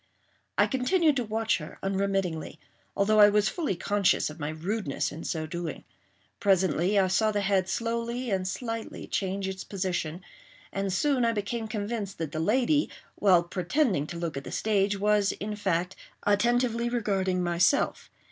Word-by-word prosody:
I - - +5
continued 300 +4 +2
to 250 - +1
watch 220 -1 0
her 150 - -9
unremittingly, 195 -4 -1 0.4
although 215 +2 +3
I 205 0 +9
was 210 0 +3
fully 310 - -2
conscious 200 -3 +1
of 155 - -12
my 145 0 -2
rudeness 160 0 -2
in 160 - -8
so 160 -1 -2
doing. 170 +1 -5 0.6
Presently 190 -1 +2
I 190 -1 +4
saw 215 +4 +2
the 205 -1 0
head 195 -2 +1
slowly 235 +3 -2
and 185 -1 0
slightly 225 +3 -4
change 195 0 -2
its 190 0 -5
position; 180 -3 -3 0.5
and 195 0 -1
soon 265 +6 +2
I 230 0 +2
became 220 +2 -3
convinced 210 -2 -4
that 160 -3 -4
the 155 - -3
lady, 260 - +2 0.2
while 185 -4 +4
pretending 180 - 0
to 170 - -6
look 170 -4 -3
at 135 - -4
the - - -8
stage 205 -2 +1
was, 210 0 +2
in 210 +1 -5
fact, 185 -3 -1 0.3
attentively 235 +3 +2
regarding 195 -6 0
myself. 175 +9 +1
200 Hz, 160 wpm, -28 LUFS, 180-225 Hz, 0.6 s, I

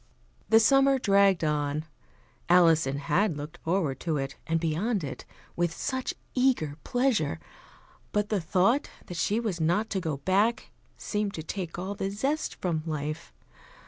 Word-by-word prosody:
The 225 - +7
summer 270 +4 +5
dragged 200 -6 +3
on. 150 0 0 0.6
Alison 165 -5 +5
had 165 +4 +1
looked 150 +1 -7
forward 165 -5 -1
to 160 -3 -1
it 135 0 -3
and 165 0 +1
beyond 175 +6 0
it 135 - -6 0.3
with 175 -1 +1
such 260 +9 -3 0.2
eager 250 - +1
pleasure; 245 - +1 0.7
but 210 0 0
the 210 -4 0
thought 195 - +2 0.2
that 175 - -7
she 205 +6 +1
was 205 -8 -2
not 175 +8 +1
to 195 - 0
go 160 -5 -2
back 195 - +1 0.3
seemed 210 -1 -2
to 160 - -5
take 175 0 -5
all 190 +3 -3
the 195 -1 -3
zest 270 +10 -2
from 170 -4 -2
life. 155 +1 -4
180 Hz, 150 wpm, -28 LUFS, 155-215 Hz, 0.7 s, The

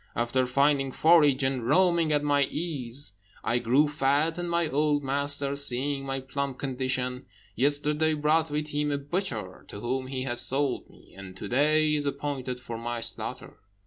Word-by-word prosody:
After 120 +2 0
finding 140 +1 +2
forage, 150 -3 +4
and 130 -2 0
roaming 170 +3 +3
at 145 -1 +2
my 145 -1 +3
ease, 145 -5 -4 0.3
I 120 +2 +1
grew 130 +6 +3
fat, 150 +3 +1
and 175 0 -3
my 170 -1 +1
old 145 0 +1
master, 140 +1 +1
seeing 135 0 0
my 135 0 -2
plump 135 0 -4
condition, 130 -1 -3 0.3
yesterday 150 +4 +2
brought 155 +2 +2
with 150 +1 -3
him 150 0 -1
a 140 - 0
butcher, 140 - -4
to 100 - -8
whom 130 +3 -2
he 130 -1 -3
has 120 -2 -1
sold 135 0 -1
me, - - -20
and 95 -1 -10
to 100 - -6
day 150 +5 +3
is 145 -1 0
appointed 140 -3 -3
for 120 -2 -7
my 120 0 -3
slaughter." - - -3
140 Hz, 170 wpm, -27 LUFS, 130-150 Hz, 0.3 s, forage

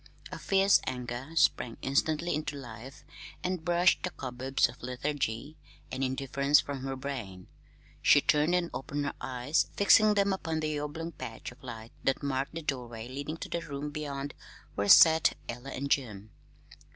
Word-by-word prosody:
A - - -6
fierce 195 0 +4
anger 125 +1 -4
sprang 125 -6 +2
instantly 155 +5 +1
into 150 0 -3
life 125 0 -10 0.4
and 180 -2 -2
brushed 175 +1 +3
the 185 - -2
cobwebs 130 -3 0
of - - -13
lethargy 135 +2 -3 0.3
and 130 +1 -2
indifference 140 +2 +2
from 140 -1 -4
her 135 +1 -4
brain. 120 -10 -6 0.6
She 145 - +6
turned 150 +4 +2
and 175 -1 0
opened 145 +2 -3
her - - -2
eyes, 130 +4 0
fixing 210 +1 +6
them 200 -1 +3
upon 165 -4 -2
the 155 -1 -1
oblong 160 +3 -5
patch 120 -7 -7
of 125 - -18
light 115 -3 -8
that 135 +2 0
marked 135 +2 -2
the 165 - -5
doorway 120 -5 -4
leading 140 +5 -5
to - - -7
the 170 - -2
room 145 -2 -5
beyond 145 -2 -4 0.4
where 100 0 -1
sat 160 +5 +7
Ella 120 +3 -6
and 140 +1 -4
Jim. 110 -6 -1
140 Hz, 165 wpm, -30 LUFS, 125-155 Hz, 0.6 s, sat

